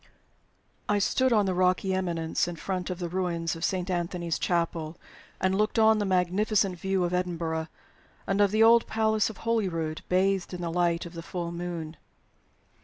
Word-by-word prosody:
I 205 - +3
STOOD 260 +6 +2
on 210 -3 +4
the 190 - 0
rocky 185 +1 +2
eminence 170 -3 -1
in 175 - -4
front 180 +2 -4
of 180 - -3
the 175 -1 -3
ruins 170 -2 -2
of 165 - -8
Saint 185 -1 -1
Anthony's 175 -1 -2
Chapel, 170 -2 -1 0.4
and 190 0 +1
looked 210 +3 0
on 220 -1 +5
the 205 - 0
magnificent 190 +1 +1
view 190 0 0
of 175 0 -1
Edinburgh 165 -3 -2 0.6
and 195 +1 +1
of 205 - +5
the 215 +2 +3
old 230 +1 +6
Palace 220 -1 +1
of 220 - -9
Holyrood, 175 -9 -1
bathed 190 0 +1
in 175 - -6
the 170 -1 -2
light 170 0 +1
of 170 - -9
the 165 - -6
full 170 0 -5
moon. 170 -2 -5
180 Hz, 180 wpm, -27 LUFS, 170-195 Hz, 0.6 s, old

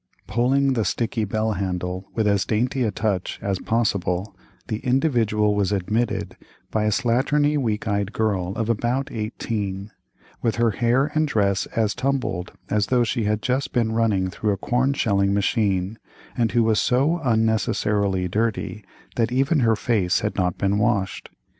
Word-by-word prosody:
Pulling 135 +5 +2
the 115 -3 +1
sticky 115 0 -1
bell 110 +2 -1
handle 90 -1 -3
with 110 -2 +1
as 100 -1 +2
dainty 125 +4 0
a 110 - +1
touch 100 -3 -2
as 100 -2 -2
possible, 100 -4 -1 0.3
the 110 - -2
Individual 115 -6 +2
was 100 -1 0
admitted 105 +4 -1 0.4
by 110 -1 0
a - - +3
slatternly 140 +7 +2
weak 115 -6 -1
eyed 100 -1 0
girl 100 -5 -1
of 115 -1 -1
about 120 +4 -1
eighteen, 105 -2 -4 0.5
with 115 - 0
her 115 -1 +2
hair 120 +6 +1
and 155 0 +2
dress 100 -6 +1
as 110 -2 +1
tumbled 125 -9 -2 0.2
as 105 -1 +1
though 125 -2 +3
she 115 -1 -1
had 105 0 0
just 130 +2 -1
been 115 -3 +1
run 105 -5 +1
through 105 +2 -1
a - - -3
corn 125 +6 +1
shelling 100 -6 +1
machine, 100 -1 0 0.4
and 115 -2 0
who 120 -1 +4
was 110 -1 +2
so 140 +8 +2
unnecessarily 105 -4 +1
dirty 110 +1 -2 0.3
that 115 0 +1
even 135 +5 +2
her 115 -3 +3
face 105 -5 +1
had 105 - -2
not 90 -2 0
been 100 +1 +1
washed. 105 -4 0
110 Hz, 160 wpm, -23 LUFS, 100-120 Hz, 0.5 s, who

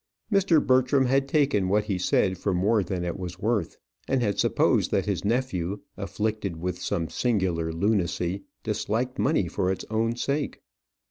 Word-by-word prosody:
Mr. 190 -5 +4
Bertram 130 +1 +3
had 135 +2 +2
taken 135 -11 +2
what 105 +2 +3
he 100 -3 -2
said 95 +1 +2
for 95 +1 -1
more 105 +4 +3
than 90 0 -3
it 85 +1 -3
was 90 -1 -5
worth; 105 -3 -1 0.3
and 130 -2 +1
had 100 -3 0
supposed - - +2
that - - +1
his - - -1
nephew, 105 -5 -1 0.2
afflicted 100 -1 -3
with 90 +1 -3
some 85 -5 -1
singular 95 -9 0
lunacy, 90 0 0 0.2
disliked 125 +4 -2
money 135 - +2
for 90 +2 0
its 95 - -4
own 115 +1 +1
sake. 140 +4 -2
105 Hz, 160 wpm, -26 LUFS, 90-125 Hz, 0.3 s, Mr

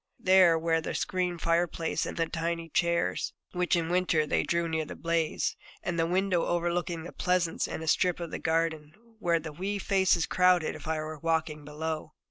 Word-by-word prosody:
There 185 -3 +5
were 165 0 +1
the - - -4
screened 180 -2 -1
fire 170 +1 +3
place 165 0 -2
and - - -6
the 165 - +2
tiny 165 0 -3
chairs 170 +2 0 0.2
which 180 0 +1
in 165 -1 0
winter 180 -3 +2
they - - +1
drew 170 0 0
near 160 -1 -1
the 150 - -8
blaze, 165 -2 -1 0.3
and 170 -1 -2
the 165 - +2
window 185 0 +1
overlooking 175 -1 -1
the 175 - -8
pleasance 180 -2 0
and 160 - -5
a - - -7
strip 180 +2 +2
of 170 -2 -5
the - - -4
garden, 160 -2 -1 0.3
where 170 -5 +2
the 160 -1 -7
wee 195 +6 -3
faces 190 -4 +2
crowded 180 -3 +3
if - - -10
I 160 0 0
were 155 0 -5
walking 160 -1 -1
below. 155 +2 -5
170 Hz, 195 wpm, -29 LUFS, 160-175 Hz, 0.3 s, There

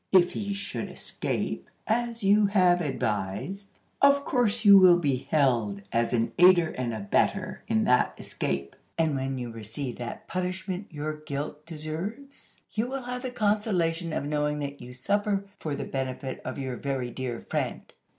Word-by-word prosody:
If 180 -2 +6
he 200 -1 -3
should 200 - -4
escape, - - -4 0.2
as 235 0 -1
you 205 +1 +5
have 180 -3 +4
advised, 130 - -3 0.2
of 280 0 +5
course 235 -4 +1
you 200 -1 +10
will 180 -2 +8
be 140 -6 -1
held 115 -9 +2
as 115 0 +1
an 115 -1 +1
aider 175 -2 +7
and 125 -2 -3
abettor 100 -3 0
in 110 - +2
that 125 0 +3
escape; 70 0 -3 0.2
and 160 -3 +2
when 135 0 -2
you 120 -2 -4
receive 115 +4 -6
that 120 -1 -6
punishment 185 +2 -3
your 155 0 -4
guilt 150 0 -5
deserves, 170 - -7
you 220 +2 0
will 265 0 -4
have 250 0 -4
the 255 - -3
consolation 205 -7 0
of 140 - -2
knowing 150 0 0
that 140 -1 -5
you 125 +1 -9
suffer 200 +9 0
for 150 -3 -3
the - - -4
benefit 130 0 -4
of 130 - -5
your 130 -3 -3
very 135 -3 -2
dear 125 -2 -4
friend! - - -2
155 Hz, 160 wpm, -27 LUFS, 130-200 Hz, 0.2 s, you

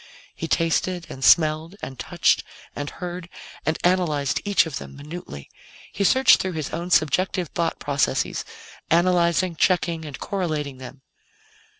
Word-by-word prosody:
He 165 - -5
tasted 165 +2 0
and 135 - -8
smelled 160 +2 +4
and 130 -2 -7
touched - - +2 0.3
and 145 0 -4
heard 175 0 -7 0.4
and 160 - +1
analyzed 165 -6 +1
each 200 -3 +3
of 145 -5 -5
them - - -10
minutely. 145 - -9 0.5
He 200 - -1
searched 260 +7 +5
through 185 -1 -3
his 155 -3 -4
own 170 +2 -4
subjective 180 +1 +2
thought 170 -1 -1
processes, 140 -2 0 0.5
analyzing, 175 0 +3
checking 170 -1 +1
and 145 -5 -7
correlating 155 -8 -3
them. 130 +1 -11
165 Hz, 135 wpm, -23 LUFS, 145-180 Hz, 0.5 s, searched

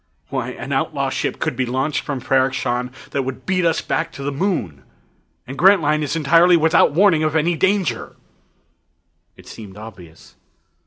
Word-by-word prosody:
Why, - - -3
an - - -8
outlaw - - -1
ship - - -2
could - - -2
be 130 0 -1
launched 130 +4 -1
from 140 -3 -4
Ferrok 130 +1 +1
Shahn 125 0 -2 0.2
that 140 - -1
would 130 0 -6
beat 185 -1 0
us 165 - 0
back 165 +1 -2
to 140 - -8
the 140 - -2
Moon 135 - -2 0.6
and 135 - -8
Grantline 165 -6 +4
is 150 +1 -2
entirely 170 +3 +4
without 160 -2 +3
warning 180 -2 +4
of 155 0 -1
any 165 +2 +1
danger!" 185 - -1 1.2
It - - -16
seemed 105 -3 -11
obvious. 95 -7 -13
145 Hz, 165 wpm, -20 LUFS, 125-170 Hz, 1.2 s, Grantline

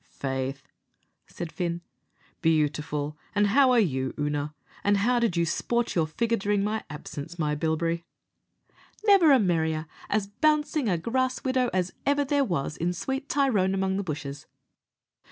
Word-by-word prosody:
"Faith," 135 +1 -4 0.6
said 170 -2 -6
Fin, 170 -1 -2 0.6
"beautiful; 150 -2 0 0.2
an' 205 0 +4
how 260 +6 +5
are 245 - +5
you, 130 - 0
Oonagh 145 0 -1 0.3
and 205 0 +3
how 240 +5 +2
did 230 -7 +1
you 170 - +3
sport 235 +8 0
your 165 -3 +1
figure 230 +8 0
during 200 0 +1
my 215 +1 -1
absence, 150 +2 -7
my 150 -3 0
bilberry?" 165 +2 -1 1.0
"Never 390 -7 +7
a 270 - +8
merrier 160 -5 +1 0.2
as 210 -1 +1
bouncing 295 +3 +1
a 175 - +2
grass 255 +8 -1
widow 255 -2 +1
as 185 0 -1
ever 285 0 +2
there 285 +1 +2
was 160 - -2
in 175 +2 0
sweet 265 +9 -4
'Tyrone 210 -10 +2
among 190 0 0
the 200 - -1
bushes.'" 150 -3 -6
185 Hz, 155 wpm, -27 LUFS, 155-240 Hz, 1.0 s, a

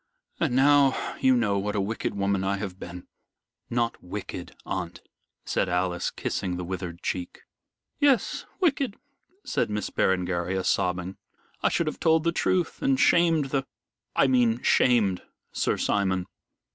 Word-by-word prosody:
And 145 -7 +1
now 140 0 +4
you 130 -1 +4
know 100 -4 +1
what 105 +2 -2
a - - +1
wicked 100 +1 -2
woman 100 -1 0
I 100 +1 0
have 95 -2 -6
been." 90 0 -8 0.6
"Not 120 -1 -1
wicked, 90 - -7
aunt," - - -4 0.4
said 95 - 0
Alice, 90 0 0
kissing 90 -1 -3
the 90 - -4
withered 90 -1 -5
cheek. 90 -1 -4 0.6
"Yes, 280 -4 +2
wicked," 285 - +1 0.5
said - - -1
Miss 105 -1 -3
Berengaria, 90 0 0
sobbing, 90 0 0 0.4
"I - - +3
should 170 - 0
have 155 - -4
told 160 -2 +3
the 170 - +2
truth 175 0 0
and 275 -2 +2
shamed 165 -5 +4
the 135 -2 -1 0.5
I - - +4
mean 125 -3 +2
shamed 105 -7 +3 0.3
Sir - - 0
Simon. 95 -3 0
105 Hz, 145 wpm, -26 LUFS, 95-145 Hz, 0.6 s, now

